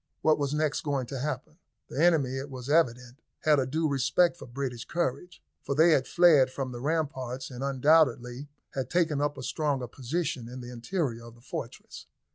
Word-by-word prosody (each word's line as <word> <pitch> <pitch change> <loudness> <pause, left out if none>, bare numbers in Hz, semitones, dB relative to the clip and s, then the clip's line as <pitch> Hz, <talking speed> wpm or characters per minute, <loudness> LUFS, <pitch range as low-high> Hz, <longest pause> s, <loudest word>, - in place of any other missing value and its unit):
What 155 -1 +4
was 140 -1 -1
next 150 -1 0
going 140 -4 -1
to 135 +2 -6
happen? 150 +4 -4 0.3
The 150 - -1
enemy, 150 -7 +3
it 135 +2 -5
was 130 0 -6
evident, 125 -3 +1 0.2
had 150 -2 +4
a 130 - 0
due 155 +4 0
respect 140 +5 +2
for 175 - -11
British 125 -1 -4
courage, 175 +2 -3 0.2
for 140 - -3
they 160 +3 +6
had 130 -4 +3
fled 160 -7 +5
from 130 0 -4
the 120 -1 -7
ramparts 135 -4 -2
and 125 +1 -6
undoubtedly 135 -2 +2 0.2
had 135 -1 -3
taken 160 -5 +1
up 145 -1 -1
a 130 - -7
stronger 140 -2 -1
position 130 0 -3
in 125 +1 -8
the 125 0 -8
interior 120 -1 -3
of 115 0 -12
the 120 - -20
fortress. - - -8
140 Hz, 190 wpm, -28 LUFS, 125-155 Hz, 0.3 s, they